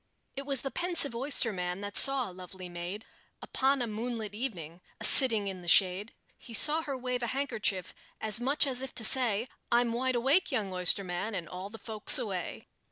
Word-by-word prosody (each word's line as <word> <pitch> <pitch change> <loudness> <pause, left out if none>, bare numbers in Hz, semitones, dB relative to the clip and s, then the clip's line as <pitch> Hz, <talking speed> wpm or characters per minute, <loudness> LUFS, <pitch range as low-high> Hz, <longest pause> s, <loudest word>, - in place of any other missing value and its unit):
It 275 0 -7
was 275 -3 -1
the 270 - -5
pensive 345 -7 +3
oysterman 215 -8 +1
that 205 0 -7
saw 270 -2 +5
a 185 - -11
lovely 185 0 -11
maid, 175 +5 -8 0.3
Upon 270 -1 -1
a - - -2
moonlight 220 -1 -6
evening, 180 - -6 0.2
a - - -9
sitting 225 -7 +5
in 190 -2 -6
the 175 - -13
shade: 190 +4 +2 0.2
He 230 - -7
saw 305 +8 +6
her 280 -4 -6
wave 250 0 -4
a 240 - -3
handkerchief, 220 -8 -3 0.3
as 220 +1 -1
much 275 +5 +1
as 260 -2 -1
if 265 -1 -8
to 230 - -3
say, 235 -4 +2 0.3
"I'm 240 -1 +1
wide 255 +2 -2
awake, 275 +9 +1
young 210 -7 -2
oysterman, 180 +3 -2
and 175 -4 -6
all 185 +4 -8
the 225 - -11
folks 220 -2 +4
away." 200 -8 -5
225 Hz, 190 wpm, -29 LUFS, 190-260 Hz, 0.3 s, saw